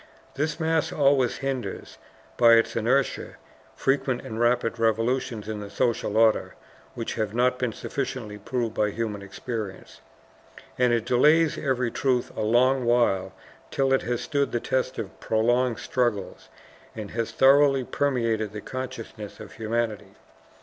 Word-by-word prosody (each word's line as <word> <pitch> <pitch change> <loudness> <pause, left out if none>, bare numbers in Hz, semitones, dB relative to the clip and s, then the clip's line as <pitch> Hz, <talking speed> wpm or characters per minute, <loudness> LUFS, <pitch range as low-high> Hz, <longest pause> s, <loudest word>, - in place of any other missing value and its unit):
This 150 +4 -2
mass 160 -1 +1
always 135 -4 +2
hinders, 135 -2 -5 0.4
by 115 -1 +6
its 115 0 +3
inertia, 125 +4 0 0.4
frequent 135 -2 0
and 110 +1 -5
rapid 120 -1 +1
revolutions 115 0 0
in 110 -1 -4
the 100 -1 -7
social 110 -2 0
order 110 -1 +3 0.4
which 115 - -4
have 110 -1 -3
not 125 +1 +2
been 125 -2 0
sufficiently 115 -4 -5
proved 115 +1 -2
by 105 -2 +1
human 105 -1 -3
experience. 100 0 -7 0.7
And 125 -1 +2
it 115 -1 +1
delays 150 +6 +4
every 130 -4 -1
truth 125 -3 0
a - - -3
long 125 +4 +3
while 105 -6 +2 0.4
till 135 -1 +1
it 135 - +3
has 120 +1 -2
stood 140 0 -1
the 120 - 0
test 130 +1 -1
of 95 - -6
prolonged 120 +2 +1
struggles, 120 -6 -2 0.5
and 105 -2 -6
has 115 -1 -2
thoroughly 135 0 +5
permeated 115 -7 -1
the 105 - -6
consciousness 120 -5 -7
of - - -10
humanity. 110 -3 -3
120 Hz, 145 wpm, -25 LUFS, 110-130 Hz, 0.7 s, by